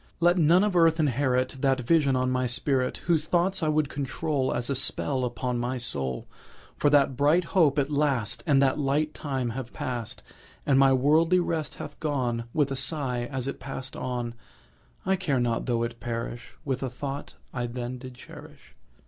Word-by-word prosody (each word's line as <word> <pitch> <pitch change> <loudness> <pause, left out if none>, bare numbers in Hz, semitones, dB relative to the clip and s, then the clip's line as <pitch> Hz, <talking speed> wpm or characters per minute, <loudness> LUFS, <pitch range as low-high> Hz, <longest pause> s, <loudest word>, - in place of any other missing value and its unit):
Let 175 +1 +4
none 170 +4 +5
of 210 -3 0
earth 165 -1 +4
inherit 130 -3 +1
That 135 -1 +2
vision 140 +1 +3
on 130 0 +1
my 130 0 +1
spirit; 130 +1 -1
Those 160 -3 +2
thoughts 185 +3 +1
I 160 - +1
would 155 -1 +2
control 140 0 -2
As 120 - -1
a 140 - 0
spell 130 0 0
upon 120 0 -2
his 125 0 -2
soul: 65 - -3 0.5
For 145 - +2
that 140 -2 +4
bright 150 +7 +3
hope 165 -5 +3
at 145 +1 +1
last 140 -7 0
And 140 -3 +5
that 135 +2 +2
light 150 +2 +1
time 130 -5 -3
have 120 0 -6
past, 125 -6 -5 0.4
And 135 -1 +4
my 135 -1 +6
worldly 155 +7 +4
rest 165 -4 -2
hath - - -8
gone 125 -6 -1
With 145 -1 +1
a - - -1
sigh 130 -3 -1
as 135 -1 -3
it 140 - -4
pass'd 135 -1 -7
on 120 -2 -3 0.7
I 190 - +3
care 150 -8 0
not 120 0 0
tho' 120 -2 +1
it 115 0 -4
perish 120 0 -5
With 135 -2 -2
a 135 - -2
thought 140 +3 -6 0.2
I 120 -1 -2
then 125 +1 -5
did 130 0 -9
cherish. 125 - -13
135 Hz, 185 wpm, -27 LUFS, 125-150 Hz, 0.7 s, my